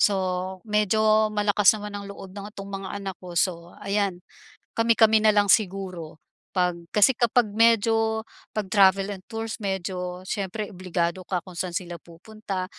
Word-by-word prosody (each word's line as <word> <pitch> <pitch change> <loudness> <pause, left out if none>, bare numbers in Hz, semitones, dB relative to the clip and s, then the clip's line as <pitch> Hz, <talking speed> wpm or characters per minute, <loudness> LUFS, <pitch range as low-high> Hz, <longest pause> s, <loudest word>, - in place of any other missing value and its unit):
so 205 - +4 0.5
medyo 215 0 +3
malakas 210 -1 +4
naman 210 0 -7
ang 200 0 -7
loob 195 -1 -10
ng 200 +1 -6
'tong 195 0 -7
mga 195 0 -5
anak 195 -1 -5
ko 180 -1 -9
so 170 -1 0
ayan, 200 -3 -1 0.5
kami-kami 225 -1 +4
na 220 - +5
lang 205 -1 +3
siguro, 185 -6 -2 0.4
pag 180 -1 +2 0.2
kasi 210 +5 +5
kapag 240 0 +2
medyo, 225 0 +3 0.3
pag 215 -2 -2
travel 195 0 +5
and 190 - -10
tours 225 -1 -4
medyo 180 -2 -3
siyempre 200 +2 -3
obligado 180 -1 -2
ka 180 -1 -2
kung 180 -2 -11
saan 180 -1 -3
sila 175 -1 -6
pupunta 190 +2 -6
200 Hz, 155 wpm, -25 LUFS, 185-215 Hz, 0.5 s, na